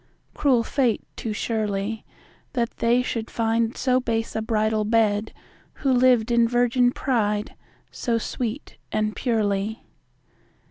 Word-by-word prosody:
Cruel 255 -5 +2
fate, 245 -1 0
too 225 - -4
surely, 210 -1 -2 0.5
That 235 -3 -2
they 240 +2 +2
should 230 -2 -3
find 230 0 0
so 255 -1 +2
base 230 -2 -2
a 220 - 0
bridal 215 -1 +1
bed, 215 -1 +1 0.4
Who 275 - -1
lived 245 -2 +4
in 235 0 +4
virgin 245 +1 +3
pride, 210 -6 -1 0.4
so 235 -1 -1
sweet 235 +3 -4
and 215 0 0
purely. 215 -2 -1
230 Hz, 125 wpm, -24 LUFS, 215-245 Hz, 0.5 s, lived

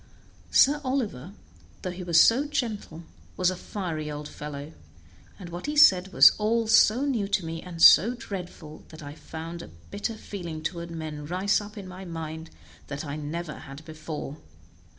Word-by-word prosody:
Sir 290 +2 +4
Oliver, 215 - -3 0.5
though 185 - -2
he 180 +1 -8
was 170 -2 +3
so 265 +6 +5
gentle, 220 - -4 0.3
was 185 0 +2
a - - -4
fiery 170 -5 -5
old 150 0 -6
fellow, 150 +1 -8 0.6
and 180 -3 -9
what 175 +9 -6
he 300 0 -2
said 190 -10 +6
was 135 +1 +8
all 225 +2 +1
so 225 +3 +5
new 235 -8 0
to 195 -3 0
me, 165 0 -5
and 175 -2 -9
so 230 +10 +8
dreadful, 180 -8 -8
that 160 -1 -11
I 145 0 -8
found 160 +2 -8
a - - -9 0.2
bitter 205 +3 -3
feeling 170 -7 -7
toward 170 0 -4
men 155 -3 -6
rise 190 +5 +1
up 210 +1 -11
in 195 -2 -7
my 185 +1 -9
mind 160 -2 -7 0.4
that 140 +1 -5
I 145 -1 -5
never 155 +2 -5
had 140 +3 -11
before. 155 -2 -7
175 Hz, 170 wpm, -26 LUFS, 155-205 Hz, 0.6 s, was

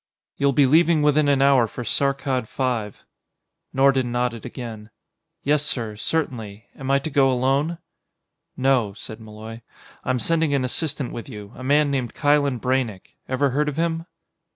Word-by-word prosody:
"You'll 140 0 +2
be 140 +1 +4
leaving 160 +2 +4
within 150 0 +3
an 140 -1 +3
hour 135 -4 +5
for 120 +3 -7
Saarkkad 135 0 0
V." 120 -6 -2 0.7
Nordon 135 -2 +3
nodded 120 -2 -2
again. 110 -4 -8 0.5
"Yes, 145 +1 +2
sir; 115 -7 -2
certainly. 110 -5 -3
Am 135 0 -6
I 140 - +5
to 145 +3 -4
go 135 -2 +4
alone?" 135 +6 +1 0.8
"No," 130 -6 +2
said 110 +2 -9
Malloy, 110 +1 -10 0.4
"I'm 130 - 0
sending 160 +3 +1
an 130 -2 +1
assistant 140 0 -2
with 115 - -7
you 105 -4 -9
a - - -9
man 145 +2 +3
named 130 -4 -2
Kylen 145 -4 +2
Braynek. 125 -6 -2
Ever 135 +1 +1
heard 150 +3 +1
of 145 - -5
him?" 165 0 -1
135 Hz, 155 wpm, -23 LUFS, 120-145 Hz, 0.8 s, hour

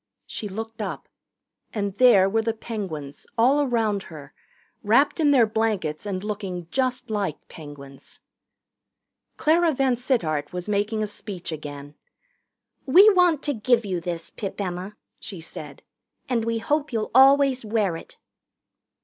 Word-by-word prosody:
She 210 - -6
looked 225 +3 -6
up. 200 - -5 0.7
And 200 -2 -2
there 225 -7 +6
were 225 +3 +1
the 225 0 -2
Penguins, 170 -12 -6
all 260 +6 +4
around 225 -7 0
her, 150 -3 -11 0.5
wrapped 255 +10 +3
in 305 -2 +4
their 260 -5 +5
blankets 210 -7 -1
and 190 -1 -3
looking 195 -5 -5
just 255 -3 -1
like 200 -8 -3
Penguins. 145 -3 -12 1.2
Clara 325 0 +3
VanSittart 240 - 0
was 180 +1 -5
making 210 +1 0
a - - 0
speech 200 -4 -6
again. 145 -2 -7 0.9
"We 385 +10 +8
want 355 -6 +3
to 290 - 0
give 235 0 +2
you 185 -3 -2
this, 165 -1 -5
Pip 200 -1 -6
Emma," 185 +1 -4 0.2
she 195 -5 -8
said, 150 -3 -10 0.4
"and 235 -3 0
we 230 0 0
hope 295 +5 -1
you'll 220 -2 -2
always 270 0 +5
wear 210 -5 0
it." - - -11
215 Hz, 140 wpm, -24 LUFS, 180-250 Hz, 1.2 s, We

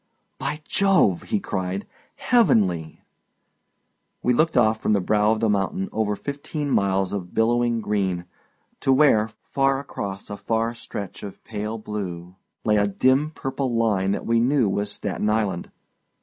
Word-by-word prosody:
"By 150 - -3
Jove!" 190 - +3
he 215 - +1
cried, 95 - -3 0.3
"heavenly!" 105 - +2 1.2
We 125 - +3
looked 155 +6 +2
off 110 0 +3
from - - +2
the 100 - +3
brow 105 +3 +2
of 110 0 0
the 115 - +3
mountain 95 -2 0
over 105 -1 0
fifteen 145 +3 -4
miles 95 -2 +1
of 90 -3 -5
billowing 120 +1 +2
green, 95 -4 -1 0.5
to 135 - +2
where, 130 -6 +4
far 135 0 +1
across 100 -8 -6
a 100 - -4
far 115 +2 -1
stretch 105 -5 -7
of 100 -2 -9
pale 105 +1 -4
blue 90 -5 -6 0.3
lay 105 -1 +3
a 105 0 +3
dim 130 +8 +2
purple 135 -4 -3
line 105 -5 +2
that - - -4
we 115 0 +2
knew 125 0 +3
was 100 +1 -1
Staten 105 +1 -2
Island. 105 -5 0
110 Hz, 150 wpm, -24 LUFS, 100-130 Hz, 1.2 s, where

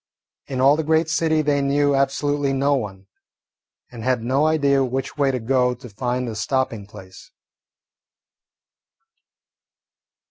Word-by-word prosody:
In 130 -2 -4
all 140 +3 +5
the 160 - -1
great 160 +1 +1
city 160 -1 +1
they 145 -1 +1
knew 145 +1 +2
absolutely 140 +1 0
no 140 +2 +1
one, 100 -7 -4 0.9
and 115 -2 -9
had 125 -2 0
no 135 +5 +2
idea 140 -3 +2
which 130 +1 -3
way 140 -2 +1
to 130 -1 -1
go 125 +1 +1
to 125 0 -12
find 125 +3 -3
a 115 - -4
stopping 115 -3 -2
place. 95 -3 -13
135 Hz, 135 wpm, -22 LUFS, 125-145 Hz, 0.9 s, all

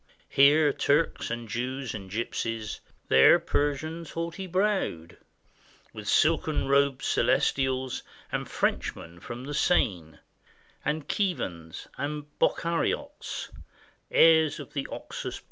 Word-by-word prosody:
Here 145 +1 +5
Turks 150 +3 +1
and 120 0 -4
Jews 125 +2 -3
and 95 -3 -7
Gypsies, 115 +1 -3 0.3
There 65 0 +7
Persians 155 +3 -2
haughty 170 +3 -4
browed; 185 - -1 0.8
With 105 -1 -8
silken 155 +2 +2
robed 140 -1 +2
Celestials, 130 -1 +1 0.3
And - - -3
Frenchmen 85 +1 -2
from 120 +7 -7
the 145 - -5
Seine, 90 - +1 0.7
And 150 0 -2
KJiivans 90 - -2
and 150 +1 -3
Bokhariotes, 170 0 -1 0.3
— - - -32
Heirs 160 -2 +5
of - - -10
the 140 -2 -3
Oxus - - -6
plain. - - -11
140 Hz, 110 wpm, -27 LUFS, 115-160 Hz, 0.8 s, There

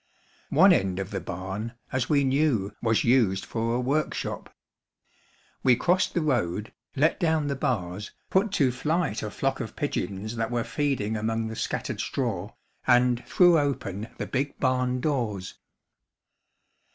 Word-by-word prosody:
One 185 +6 +6
end 95 - +1
of 95 0 -4
the - - -2
barn, 95 +6 -5 0.2
as 130 -2 -1
we 145 -2 +4
knew, 130 -7 +1
was 115 -2 +2
used 115 -6 +3
for 115 0 -1
a - - +1
workshop. 140 +5 -2 1.1
We 125 -2 +5
crossed 180 +8 +1
the 170 - +1
road, 110 - -1 0.2
let 150 +4 +2
down 160 -4 +2
the 140 -1 -1
bars, 105 -6 -2 0.2
put 195 +2 +2
to 135 -9 +3
flight 150 -1 -1
a 105 - -3
flock 135 +5 -1
of 115 -4 -5
pigeons 110 -5 -3
that 115 0 -1
were 120 -1 0
feeding 115 -3 -1
among 110 +1 -1
the 110 - -6
scattered - - -3
straw, 110 -6 -2 0.4
and 125 -1 +4
threw 175 -3 +5
open 110 -8 -2
the - - -3
big 140 +2 -2
barn 125 -1 +1
doors. 115 -11 -2
125 Hz, 150 wpm, -26 LUFS, 110-140 Hz, 1.1 s, One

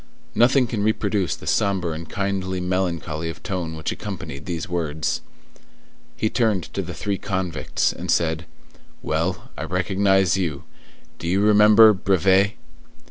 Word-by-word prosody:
Nothing 125 +2 +4
can 115 -3 -3
reproduce 105 -3 0
the - - -12
sombre 95 -4 +1
and 80 0 -7
kindly 95 -1 -2
melancholy 85 -3 -2
of 80 - -9
tone 90 -5 -3
which 80 - -3
accompanied 90 -9 -7
these 85 -2 -3
words. 80 -3 -2 1.0
He 110 - +1
turned 110 -6 +1
to - - -1
the - - -7
three 100 -2 -2
convicts, 95 -5 -1
and - - -8
said:— 80 0 +1 0.6
"Well, 90 +9 -2
I - - -5
recognize 95 +1 +2
you; 80 -6 -2 0.6
do 85 - -5
you 95 +3 +2
remember, 105 +1 +7
Brevet?" 95 +1 +3
95 Hz, 135 wpm, -23 LUFS, 85-100 Hz, 1.0 s, remember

